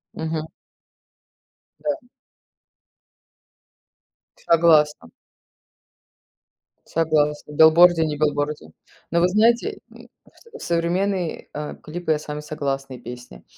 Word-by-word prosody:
Мгм. 160 -1 -3 1.4
Да. 290 -4 -3 2.4
Согласна. 155 - +3 1.8
Согласна. 150 -2 0
Билборде 160 +2 +6
не 150 - -2
билборде. 145 - -2 0.4
Но 170 - +1
вы 175 - +4
знаете, 235 - +2
м, - - -15 0.2
в - - -26 0.2
сов - - -14
современные, 175 +1 -1
а, 150 0 -6
клипы, 170 +1 -5
я 150 - +1
с - - -13
вами 150 0 -5
согласна, 135 -3 -4
и 125 - -9
песни. 120 - -11
160 Hz, 95 wpm, -22 LUFS, 150-175 Hz, 2.4 s, Билборде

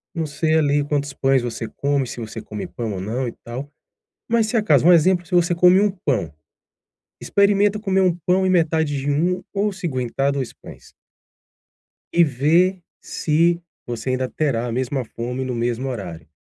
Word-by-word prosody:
Não 165 -2 -1
sei 155 +2 0
ali 145 -2 +2
quantos 145 -1 -2
pães 135 -1 +2
você 115 -1 -4
come, 140 +1 -1
se 120 - -7
você 110 -1 -6
come 105 -1 -6
pão 115 -3 -5
ou 95 - -5
não, 120 +6 -2
e - - -3
tal. 125 +5 -6 0.6
Mas, 230 -1 +2
se 220 - -1
acaso, 215 -7 +3
um 180 - +8
exemplo, 175 +1 +3
se 180 - -5
você 175 0 +3
come 180 +2 +5
1 205 0 +3
pão, 120 - -2 0.9
experimenta 200 +1 +2
comer 195 -3 0
1 180 -3 +3
pão 185 +1 +2
e - - +2
metade 160 -4 +1
de 140 +2 -1
1, 180 +6 0
ou, 205 0 0
se 185 -2 -4
aguentar, 135 0 -1
2 135 -3 -3
pães - - -14 1.2
e 170 - +5
ver 165 +7 +2 0.2
se 170 +2 +1 0.2
você 120 +2 -3
ainda 130 0 -1
terá 135 -7 -1
a - - -3
mesma 130 +2 -2
fome 125 +3 -5
no 130 -1 -3
mesmo 120 +2 -2
horário. 85 -9 -7
145 Hz, 185 wpm, -21 LUFS, 125-180 Hz, 1.2 s, um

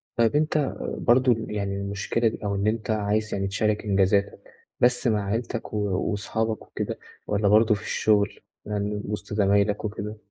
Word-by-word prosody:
طيّب 115 +4 +2
أنت 150 -2 +1 0.2
برضه 125 0 +4
يعني 100 -2 -2
المشكلة 100 +4 -1
دي، 110 - -2
أو 100 -1 -1
إن 100 +2 0
أنت 110 +1 -1
عايز 110 +1 0
يعني 95 0 -1
تشارك 105 +2 0
إنجازاتك، 100 0 +2 0.4
بس 125 0 +3
مع 105 -3 +1
عيلتك 115 +2 -3
و - - -1 0.3
وصحابك 110 +2 -2
وكده، - - -5 0.3
والَّا 105 0 +1
برضه 110 +1 +5
في 105 - -7
الشغل، 105 -2 +1 0.3
يعني 105 0 -2
وسط 105 0 -5
زمايلك 100 +1 +2
وكده؟ 105 0 -5
105 Hz, 155 wpm, -25 LUFS, 100-110 Hz, 0.4 s, برضه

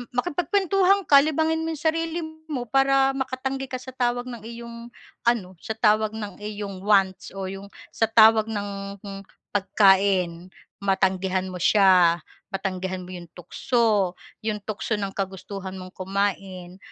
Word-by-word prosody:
makipagkuwentuhan 380 +6 +2
ka, 280 -1 +9
libangin 320 +1 0
mo 325 - -2
'yung 300 - -7
sarili 330 +1 -2 0.3
mo 270 -6 -3
para 270 0 +4
makatanggi 265 +1 -3
ka 255 - -5
sa 260 - -9
tawag 245 0 0
ng 235 -3 -8
iyong 235 0 -9 0.4
ano, 195 -7 0
sa 220 - -4
tawag 215 -1 +2
ng 210 -4 -6
iyong 205 -2 -6
wants 195 -3 +2
o 190 -1 -4
'yung 195 +1 -7 0.2
sa 225 - +1
tawag 220 -1 +6
ng 200 -2 -5 0.5
pagkain, 190 -3 +2 0.3
matanggihan 190 -1 0
mo 180 - -6
siya, 180 -4 +5 0.3
matanggihan 190 -1 -3
mo 180 - -11
'yong 175 -1 -9
tukso, 210 0 0 0.3
'yong 210 -2 -2
tukso 215 +1 -3
ng 200 -2 -3
kagustuhan 190 0 -5
mong 185 0 -9
kumain 190 -1 -3
205 Hz, 140 wpm, -24 LUFS, 190-245 Hz, 0.5 s, ka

